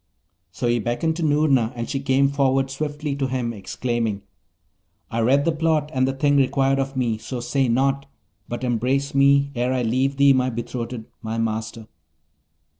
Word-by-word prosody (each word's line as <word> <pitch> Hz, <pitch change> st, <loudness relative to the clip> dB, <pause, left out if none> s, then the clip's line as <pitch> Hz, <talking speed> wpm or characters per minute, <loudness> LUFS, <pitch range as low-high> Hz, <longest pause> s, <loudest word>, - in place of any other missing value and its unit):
So 120 Hz, -, -4 dB
he 120 Hz, 0 st, +2 dB
beckoned 120 Hz, +9 st, -1 dB
to 170 Hz, -, -2 dB
Noorna, 145 Hz, -6 st, +2 dB
and 115 Hz, -1 st, -4 dB
she 135 Hz, -, -2 dB
came 135 Hz, 0 st, +2 dB
forward 135 Hz, -1 st, +1 dB
swiftly 150 Hz, 0 st, -3 dB
to 135 Hz, -1 st, 0 dB
him, 125 Hz, -2 st, -2 dB
exclaiming, 110 Hz, 0 st, -3 dB, 0.9 s
'I 115 Hz, -, -1 dB
read 135 Hz, +5 st, +3 dB
the 165 Hz, -, +3 dB
plot, 155 Hz, -1 st, 0 dB
and 130 Hz, 0 st, +2 dB
the 135 Hz, -, 0 dB
thing 145 Hz, +1 st, +2 dB
required 135 Hz, 0 st, +2 dB
of 135 Hz, 0 st, -3 dB
me; 115 Hz, -4 st, 0 dB
so 120 Hz, +3 st, -5 dB
say 125 Hz, +2 st, 0 dB
nought, 135 Hz, +3 st, +1 dB, 0.4 s
but 120 Hz, +1 st, -5 dB
embrace 130 Hz, +4 st, 0 dB
me 140 Hz, 0 st, +4 dB
ere 125 Hz, 0 st, 0 dB
I 125 Hz, -1 st, 0 dB
leave 130 Hz, +4 st, 0 dB
thee, 140 Hz, 0 st, +6 dB
my 130 Hz, -1 st, +1 dB
betrothed, 120 Hz, -1 st, -5 dB, 0.2 s
my 110 Hz, 0 st, -4 dB
master!' 110 Hz, 0 st, -3 dB
130 Hz, 175 wpm, -23 LUFS, 120-140 Hz, 0.9 s, thee